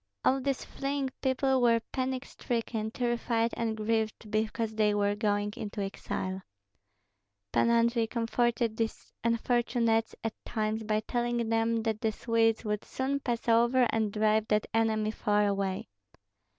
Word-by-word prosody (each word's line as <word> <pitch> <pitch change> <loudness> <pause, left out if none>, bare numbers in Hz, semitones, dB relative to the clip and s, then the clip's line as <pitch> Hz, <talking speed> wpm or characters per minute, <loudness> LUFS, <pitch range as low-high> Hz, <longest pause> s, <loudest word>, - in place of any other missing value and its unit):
All 270 +1 +3
these 275 0 -1
fleeing 275 -1 -2
people 265 0 +2
were 230 -1 +5
panic 260 0 -2
stricken, 225 -3 -3
terrified 235 -1 0
and 225 -1 -1
grieved 220 0 -1
because 220 +1 -1
they 210 -1 +2
were 205 0 +2
going 205 -1 0
into 210 0 -6
exile. 190 -1 -4 1.1
Pan 235 - +3
Andrei 235 0 +3
comforted 235 -1 0
these 225 -1 -3
unfortunates 230 -1 +1
at 225 -1 -2
times 215 -1 -1
by 215 0 +1
telling 240 0 -1
them 225 0 +1
that 220 -1 -1
the 220 - +1
Swedes 225 0 +1
would 210 0 -1
soon 270 +2 -2
pass 240 -4 -3
over 240 +2 +4
and 220 -2 0
drive 215 +1 +2
that 210 0 +2
enemy 220 -1 +2
far 210 -1 +1
away. 195 -2 -1
225 Hz, 140 wpm, -30 LUFS, 215-240 Hz, 1.1 s, were